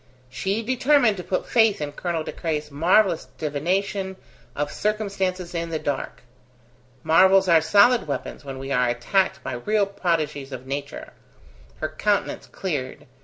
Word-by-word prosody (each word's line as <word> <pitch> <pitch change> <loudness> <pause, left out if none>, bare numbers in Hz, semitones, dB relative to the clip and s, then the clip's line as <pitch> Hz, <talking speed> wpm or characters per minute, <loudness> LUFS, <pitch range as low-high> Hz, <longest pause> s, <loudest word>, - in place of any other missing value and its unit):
She 195 - -2
determined 255 -2 +3
to 180 - -6
put 185 - -2
faith 225 -3 +3
in 150 -1 -3
Colonel 165 +1 -3
De - - -5
Craye's 150 -3 -3
marvellous 170 +4 +3
divination 190 +6 -1 0.4
of 145 0 -2
circumstances 195 -4 -2
in 170 -1 -3
the 160 - -2
dark. 145 -4 -4 0.8
Marvels 190 +3 +5
are 165 -2 +6
solid 205 +5 +4
weapons 140 0 -5
when 135 -1 -7
we 135 +1 -6
are 125 -2 +2
attacked 185 +11 0
by - - -4
real 205 - +1
prodigies 155 -8 -2
of 130 -1 -7
nature. 140 +1 -6 0.7
Her 155 - -1
countenance 200 +6 -1
cleared. 145 -9 -4
170 Hz, 145 wpm, -24 LUFS, 145-200 Hz, 0.8 s, are